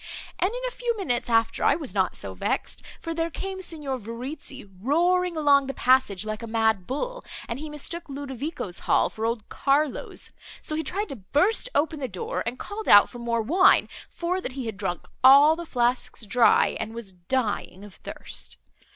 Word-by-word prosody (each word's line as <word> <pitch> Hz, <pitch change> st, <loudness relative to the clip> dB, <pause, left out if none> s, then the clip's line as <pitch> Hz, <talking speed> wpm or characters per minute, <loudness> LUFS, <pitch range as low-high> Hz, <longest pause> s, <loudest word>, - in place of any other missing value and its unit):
And 365 Hz, -, +3 dB
in -, -, -5 dB
a -, -, -4 dB
few 475 Hz, -2 st, -2 dB
minutes 245 Hz, -, -1 dB
after 225 Hz, -1 st, +2 dB
I -, -, +5 dB
was 300 Hz, -6 st, -6 dB
not 190 Hz, -2 st, +1 dB
so 95 Hz, -1 st, -6 dB
vexed, 90 Hz, -, -3 dB, 0.2 s
for 330 Hz, -, -4 dB
there 330 Hz, 0 st, -1 dB
came 380 Hz, +2 st, -5 dB
Signor 295 Hz, -7 st, -4 dB
Verezzi 260 Hz, +5 st, -7 dB, 0.2 s
roaring 350 Hz, -, +2 dB
along 280 Hz, -3 st, +4 dB
the 270 Hz, -, -4 dB
passage, 250 Hz, -7 st, +3 dB
like 215 Hz, +1 st, -4 dB
a 230 Hz, -, -6 dB
mad 220 Hz, -4 st, +1 dB
bull, -, -, -3 dB, 0.2 s
and 235 Hz, +2 st, -4 dB
he 310 Hz, +1 st, -6 dB
mistook 300 Hz, +3 st, -4 dB
Ludovico's 275 Hz, -, -5 dB
hall, -, -, +3 dB
for 220 Hz, +1 st, -2 dB
old 230 Hz, -2 st, -3 dB
Carlo's; 280 Hz, 0 st, 0 dB, 0.3 s
so -, -, -2 dB
he 315 Hz, -, 0 dB
tried 400 Hz, +6 st, -2 dB
to 275 Hz, -, -6 dB
burst 330 Hz, -, +2 dB
open 310 Hz, +1 st, +1 dB
the 265 Hz, -, -2 dB
door, 180 Hz, -3 st, -4 dB
and 245 Hz, +2 st, -3 dB
called 420 Hz, +7 st, -5 dB
out 205 Hz, -, +8 dB
for 245 Hz, -, -9 dB
more 235 Hz, -1 st, -1 dB
wine, 365 Hz, -, +5 dB, 0.2 s
for 360 Hz, +2 st, -2 dB
that 265 Hz, -, -5 dB
he 265 Hz, -2 st, -5 dB
had 220 Hz, -2 st, -4 dB
drunk 185 Hz, -3 st, -4 dB, 0.2 s
all 280 Hz, +4 st, +8 dB
the 340 Hz, 0 st, -7 dB
flasks 245 Hz, -3 st, 0 dB
dry, 235 Hz, +4 st, +4 dB
and 225 Hz, -, -5 dB
was 230 Hz, -4 st, -6 dB
dying 200 Hz, 0 st, -2 dB
of 205 Hz, -, -13 dB
thirst. -, -, -6 dB
270 Hz, 190 wpm, -25 LUFS, 225-330 Hz, 0.3 s, out